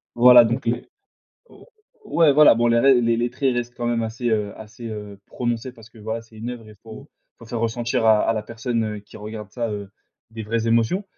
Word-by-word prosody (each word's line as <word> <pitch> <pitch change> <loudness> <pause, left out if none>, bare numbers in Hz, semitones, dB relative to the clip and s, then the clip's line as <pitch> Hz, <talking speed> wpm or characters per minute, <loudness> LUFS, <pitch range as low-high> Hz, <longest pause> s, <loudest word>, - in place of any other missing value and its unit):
Voilà 120 0 +8
donc 120 +3 -2
le 120 +1 -1 0.7
ou - - -17 0.5
ouais, 155 -4 +6
voilà, 150 -3 +7
bon 120 +1 +1
la 115 0 +3
ré 135 -1 +5
les 115 -1 +1
les 120 0 -1
traits 135 +1 0
restent 120 0 -4
quand 120 - -3
même 120 -1 0
assez, 115 +2 -3
heu 105 -2 -1
assez, 110 +2 -10
heu, 105 -2 -8
prononcé 120 0 -3
parce 115 -1 -17
que 115 - -18
voilà, 110 +2 -5
c'est 115 -1 -19
une 115 +3 -5
oeuvre 115 -3 -9
et - - -14
faut 115 +6 -12 0.3
faut 115 - -13
faire 115 0 -4
ressentir 115 0 -1
à 110 -1 +5
à - - +2
la 110 -1 -3
personne, 115 +1 -3
heu, 105 -1 -4
qui 100 - -15
regarde 105 0 -8
ça, 115 0 -3
heu, 100 -2 -6 0.4
des 110 0 -7
vraies 115 +1 -2
émotions, 115 - +1
115 Hz, 230 wpm, -22 LUFS, 110-120 Hz, 0.7 s, Voilà